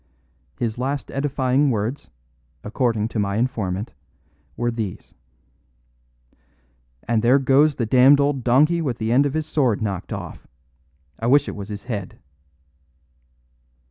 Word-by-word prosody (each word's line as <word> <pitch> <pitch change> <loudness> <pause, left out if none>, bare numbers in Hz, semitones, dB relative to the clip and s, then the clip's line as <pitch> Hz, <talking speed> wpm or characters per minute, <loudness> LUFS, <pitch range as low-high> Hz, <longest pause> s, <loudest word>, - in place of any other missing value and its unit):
His 115 -1 -3
last 135 +2 -3
edifying 135 0 +1
words, 115 +3 -3 0.5
according 110 -1 -1
to 115 - -3
my 100 -1 -1
informant, 105 - -2 0.6
were 120 0 0
these: 110 -5 -6 1.9
'And 115 -2 +1
there 120 +4 +4
goes 140 +2 +3
the 120 - -1
damned 130 +5 +5
old 140 -2 0
donkey 150 +8 +3
with 130 -7 -2
the 110 0 -2
end 140 +4 +4
of 140 - -5
his 155 -1 -1
sword 130 -9 +1
knocked 100 -5 -4
off. - - -7 0.7
I 115 - -2
wish 145 +3 +4
it - - -5
was 100 0 -8
his 105 -1 -7
head. 105 -7 -6
125 Hz, 135 wpm, -22 LUFS, 110-140 Hz, 1.9 s, damned